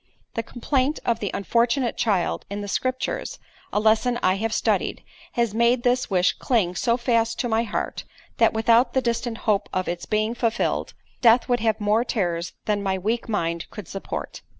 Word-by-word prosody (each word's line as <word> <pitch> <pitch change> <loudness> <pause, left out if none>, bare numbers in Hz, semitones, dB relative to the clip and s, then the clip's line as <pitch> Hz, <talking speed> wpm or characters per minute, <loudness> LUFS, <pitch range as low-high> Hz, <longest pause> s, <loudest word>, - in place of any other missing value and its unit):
The 230 - -1
complaint 255 +5 -1
of 235 -1 +1
the 205 - -2
unfortunate 235 +5 +1
child 200 -6 0
in 200 +1 -4
the 205 - -5
scriptures 255 +6 -2 0.3
(a - - +1
lesson 220 +3 +3
I 185 +1 +3
have 225 +2 -1
studied) - - 0 0.3
has 235 -3 0
made 235 +2 +3
this 250 +1 +1
wish 180 -2 +3
cling 210 -9 +1
so 235 +6 +1
fast 230 -2 +1
to 245 - -1
my 225 -1 +2
heart, 215 - -3 0.3
that - - +5
without 230 +3 +3
the 260 - +2
distant 235 0 -1
hope 210 -3 +1
of 185 0 -1
its 175 0 -4
being 215 +1 +1
fulfilled, 235 -1 -1 0.3
death 235 0 +5
would 245 -1 +2
have 220 -1 +1
more 210 +2 +2
terrors 175 -8 -2
than 210 -1 0
my 190 -1 0
weak 225 +5 -2
mind 170 -5 -1
could 210 -6 -9
support. 195 - -6
225 Hz, 180 wpm, -24 LUFS, 205-240 Hz, 0.3 s, that